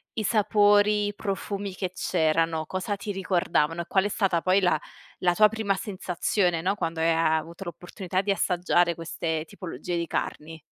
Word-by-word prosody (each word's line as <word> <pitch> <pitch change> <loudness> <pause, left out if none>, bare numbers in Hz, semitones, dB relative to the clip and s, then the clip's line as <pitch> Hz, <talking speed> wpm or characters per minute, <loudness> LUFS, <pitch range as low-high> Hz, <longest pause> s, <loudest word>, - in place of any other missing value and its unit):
i 220 - -2
sapori, 205 -1 +3
i 205 - -5
profumi 200 -1 -4
che 185 -2 -3
c'erano 165 -2 +1
cosa 190 +2 -2
ti 205 +1 -5
ricordavano? 175 -4 0
E 170 - -8
qual 190 0 +2
è - - 0
stata 190 -5 +1
poi 185 +2 +3
la 175 -4 +2 0.4
la 175 -1 +2
tua 215 0 +7
prima 220 -3 -1
sensazione, 180 -2 -1
no, 190 +3 0
quando 165 -5 -3
hai 165 +1 +3
a 160 -1 +3
avuto 165 +4 -6
la 175 - -4
possibilità 185 +1 -3
di 200 0 0
assaggiare 175 -2 +2
queste 160 -1 -3
tipologia 180 -1 -6
di 170 0 -2
carni? 160 0 -4
180 Hz, 180 wpm, -26 LUFS, 165-200 Hz, 0.4 s, tua